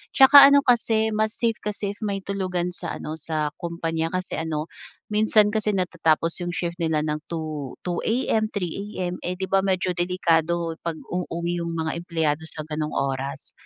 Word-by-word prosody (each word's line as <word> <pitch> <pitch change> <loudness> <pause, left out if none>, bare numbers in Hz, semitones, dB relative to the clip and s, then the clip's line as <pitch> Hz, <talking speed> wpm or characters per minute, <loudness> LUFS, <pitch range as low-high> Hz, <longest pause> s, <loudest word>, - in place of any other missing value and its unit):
'tsaka 275 +1 +10
ano 280 0 +6
kasi, 225 -3 +3
mas 215 +1 0
safe 230 -2 0
kasi 205 -1 -3
if - - -24
may 200 -2 -2
tulugan 185 -3 -2
sa 175 -1 -5
ano, 155 +1 -6
sa 155 -1 -2
kumpanya 165 -2 -2
kasi 185 -3 -3
ano, 160 -1 -3 0.4
minsan 210 0 +4
kasi 215 -1 0
natatapos 165 -3 +1
'yong 175 0 -3
shift 170 0 -3
nila 160 -2 +1
ng 150 0 -1
2, 155 -5 -5
2:00 175 -1 -2
AM, 220 -2 +1
3:00 200 +3 -4
AM, 180 0 -2
eh, 180 +1 -2
'di 190 - -2
ba, 195 - +5
medyo 185 -1 +1
delikado 170 -2 +1
pag-uuwi 170 +1 -3
'yong 170 0 -3
mga 160 -1 -1
empleyado 160 -3 -1
sa 155 -1 -6
gano'ng 150 0 -3
oras. 135 0 -2
175 Hz, 170 wpm, -24 LUFS, 160-200 Hz, 0.4 s, tsaka